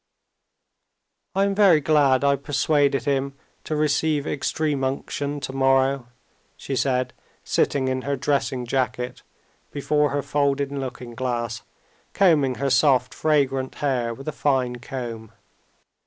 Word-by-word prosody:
"I 195 - +3
am 200 0 +1
very 195 -6 +5
glad 140 -3 +3
I 140 0 +4
persuaded 140 0 +1
him 140 -1 -1 0.3
to 155 - -2
receive 150 0 +1
extreme 145 -1 -1
unction 140 +2 -3
tomorrow," 135 -1 +1 0.5
she 135 - -4
said, 130 -1 0 0.3
sitting 135 -2 +1
in 130 0 -1
her 140 +1 -2
dressing 135 -2 -1
jacket 125 0 -2 0.5
before 150 +1 +1
her 145 0 -2
folding 140 0 0
looking 125 -2 -6
glass, 120 -1 -3 0.5
combing 150 -9 +3
her 135 +3 -1
soft, 130 -4 +3
fragrant 135 -4 0
hair 125 -5 -1
with 135 +5 -9
a - - 0
fine 130 -5 0
comb. 115 -3 -7
135 Hz, 125 wpm, -23 LUFS, 130-145 Hz, 0.5 s, very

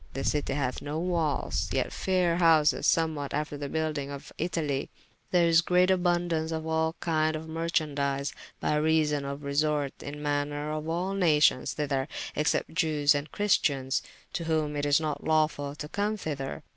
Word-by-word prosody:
This 135 +1 0
citie 145 -2 -1
hath 130 -3 -2
no 145 +2 -4
walles, 165 -4 -1
yet - - -1
fayre 180 -3 +1
houses, 160 -3 +4
somewhat 155 -4 +1
after 150 0 -2
the 145 -1 -5
buyldyng 155 -3 -2
of 140 -1 -8
Italie. 150 -6 -1 0.4
Here 175 -2 +4
is 165 -1 +5
great 180 +1 +3
aboundaunce 175 -3 +1
of 160 -1 -3
all 160 0 0
kynd 155 -1 +1
of 155 +1 -6
merchandies, 145 -4 -1 0.3
by 150 - +1
reason 150 -2 +2
of 140 +1 -5
resorte 145 0 0
in 145 +1 -7
manner 145 0 -1
of 155 +1 -4
all 180 +4 -1
nations 150 -8 +3
thyther, 140 -3 -1 0.3
except 150 +1 0
jewes 155 -4 +3
and 145 +1 -3
christians, 140 -10 +1 0.3
to 170 - -3
whom 155 -2 0
it 145 0 -1
is 145 +1 +4
not 150 -2 -3
lawfull 150 -2 +1
to 150 - -5
come 205 +5 -1
thyther. 140 -7 -4
155 Hz, 165 wpm, -28 LUFS, 145-165 Hz, 0.4 s, is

